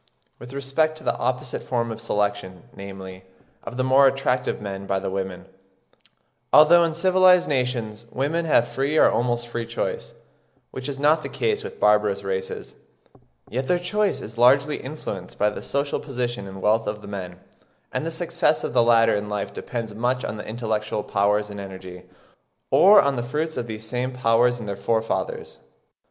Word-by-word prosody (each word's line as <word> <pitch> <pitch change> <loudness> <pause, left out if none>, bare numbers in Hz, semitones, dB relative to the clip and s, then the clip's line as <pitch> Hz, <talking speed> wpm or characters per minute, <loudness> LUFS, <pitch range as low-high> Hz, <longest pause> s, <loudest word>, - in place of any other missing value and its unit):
With 125 - -10
respect 140 +4 0
to 155 - -12
the - - 0
opposite 125 +1 -2
form 115 -2 -2
of 110 0 -7
selection, 100 -4 -2
namely, 95 -1 -9 0.4
of 120 - -7
the 130 - +1
more 135 +1 +6
attractive 130 -1 0
men 100 -1 -6
by 95 - 0
the 95 0 -3
women, 95 -1 -4 1.1
although 165 +3 +7
in 165 -1 -1
civilised 185 0 +5
nations 120 -5 -2
women 150 +7 -1
have 120 -7 +3
free 140 +4 -1
or - - +6
almost 120 0 0
free 120 -1 -4
choice, 115 - -4 0.6
which 130 +2 -6
is 135 -1 -5
not 150 +2 +3
the - - -6
case 435 -1 -1
with 460 - -8
barbarous 105 -1 +3
races, 95 -1 -4 0.7
yet 130 +3 -3
their 180 - +3
choice 205 +4 0
is 115 +2 -9
largely 140 +4 +4
influenced 115 -10 -7
by 105 +1 +2
the - - -7
social 140 +1 -1
position 120 -7 -4
and 95 0 -9
wealth 110 +2 +2
of 105 0 -4
the - - -9
men; 90 -3 -7 0.5
and - - -2
the 165 - -2
success 165 -1 0
of - - -3
the 120 - +5
latter 115 -1 +4
in 105 0 -2
life 105 -1 -3
depends 115 -3 -5
much 125 +4 -1
on 110 - -4
their 105 - -8
intellectual 110 -2 -2
powers 105 +1 +1
and 100 - -7
energy, 95 -2 -9 0.6
or 205 +2 +8
on 140 -2 +2
the - - 0
fruits 150 +6 -3
of 120 - -3
these 110 0 -6
same 125 +2 -2
powers 120 0 +2
in 115 - -7
their 100 -1 -3
forefathers. 110 +3 -2
120 Hz, 180 wpm, -23 LUFS, 105-140 Hz, 1.1 s, or